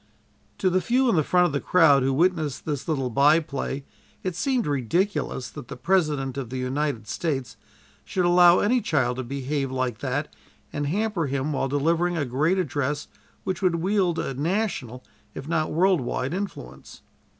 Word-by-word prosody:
To 185 Hz, -, +1 dB
the 185 Hz, +1 st, +2 dB
few 255 Hz, +4 st, +2 dB
in -, -, +2 dB
the 155 Hz, -, +3 dB
front 180 Hz, +4 st, +3 dB
of 175 Hz, -, 0 dB
the 140 Hz, -, -1 dB
crowd 160 Hz, -6 st, +5 dB
who 135 Hz, +1 st, +1 dB
witnessed 155 Hz, -1 st, 0 dB
this 145 Hz, -4 st, -3 dB
little 135 Hz, -6 st, -1 dB
by 145 Hz, +6 st, +5 dB
play 140 Hz, -2 st, -4 dB, 0.4 s
it 185 Hz, -2 st, -2 dB
seemed 255 Hz, +3 st, 0 dB
ridiculous 145 Hz, -, -1 dB
that 145 Hz, -6 st, -9 dB
the -, -, -8 dB
President 145 Hz, -6 st, 0 dB
of 125 Hz, -4 st, -5 dB
the 130 Hz, -, -5 dB
United 130 Hz, -2 st, -2 dB
States 135 Hz, -9 st, -3 dB, 0.5 s
should 180 Hz, -2 st, -1 dB
allow 175 Hz, 0 st, +6 dB
any 240 Hz, +4 st, +2 dB
child 135 Hz, -, 0 dB
to 130 Hz, -, -3 dB
behave 135 Hz, +1 st, -3 dB
like 130 Hz, -3 st, -2 dB
that 140 Hz, +3 st, -3 dB, 0.4 s
and 145 Hz, -1 st, -2 dB
hamper 200 Hz, -1 st, -1 dB
him 140 Hz, +2 st, -2 dB
while 135 Hz, -, 0 dB
delivering 165 Hz, +5 st, +1 dB
a 150 Hz, -, 0 dB
great 150 Hz, +9 st, +1 dB
address 145 Hz, -4 st, -2 dB, 0.3 s
which 190 Hz, -, -3 dB
would 180 Hz, -3 st, +2 dB
wield 180 Hz, 0 st, +1 dB
a 135 Hz, -, -2 dB
national, 150 Hz, -, -2 dB, 0.3 s
if 135 Hz, -, -7 dB
not 160 Hz, -1 st, 0 dB
world 180 Hz, 0 st, +3 dB
wide 130 Hz, +3 st, -2 dB
influence. 70 Hz, -, -7 dB
150 Hz, 175 wpm, -25 LUFS, 135-180 Hz, 0.5 s, allow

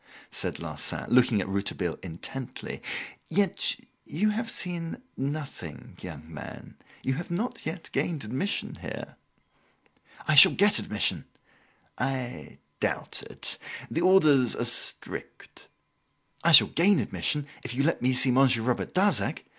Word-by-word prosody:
said -, -, -3 dB
Larsan, -, -, -2 dB
looking 120 Hz, -4 st, +4 dB
at -, -, -4 dB
Rouletabille 95 Hz, -3 st, -2 dB
intently, 95 Hz, +9 st, -7 dB, 0.5 s
"yet 200 Hz, -2 st, +2 dB, 0.3 s
you 210 Hz, +8 st, 0 dB
have 225 Hz, +2 st, -3 dB
seen 170 Hz, -2 st, -4 dB, 0.2 s
nothing, 135 Hz, -, -6 dB
young 80 Hz, -4 st, -8 dB
man 80 Hz, -2 st, -10 dB, 0.3 s
you 130 Hz, -, 0 dB
have 165 Hz, +6 st, -5 dB
not 195 Hz, +5 st, -3 dB
yet 165 Hz, +2 st, -6 dB
gained 160 Hz, -5 st, -2 dB
admission 130 Hz, -, -2 dB
here!" -, -, -7 dB, 1.1 s
"I 155 Hz, -, +3 dB
shall 150 Hz, -, +10 dB
get 205 Hz, +1 st, +4 dB
admission." 105 Hz, -, 0 dB, 0.7 s
"I 130 Hz, -2 st, -4 dB, 0.2 s
doubt -, -, -2 dB
it. -, -, -2 dB, 0.3 s
The 165 Hz, -, -1 dB
orders 155 Hz, -9 st, +4 dB
are -, -, -2 dB
strict." -, -, -4 dB, 0.8 s
"I -, -, +4 dB
shall -, -, +10 dB
gain 190 Hz, +4 st, +3 dB
admission, 150 Hz, -2 st, -1 dB, 0.2 s
if 120 Hz, -1 st, -5 dB
you 140 Hz, -, +1 dB
let 165 Hz, -, +1 dB
me 130 Hz, +1 st, +2 dB
see 125 Hz, +1 st, +4 dB
Monsieur 125 Hz, -3 st, +4 dB
Robert 125 Hz, +7 st, -2 dB
Darzac. 200 Hz, +3 st, +1 dB
135 Hz, 130 wpm, -27 LUFS, 120-175 Hz, 1.1 s, shall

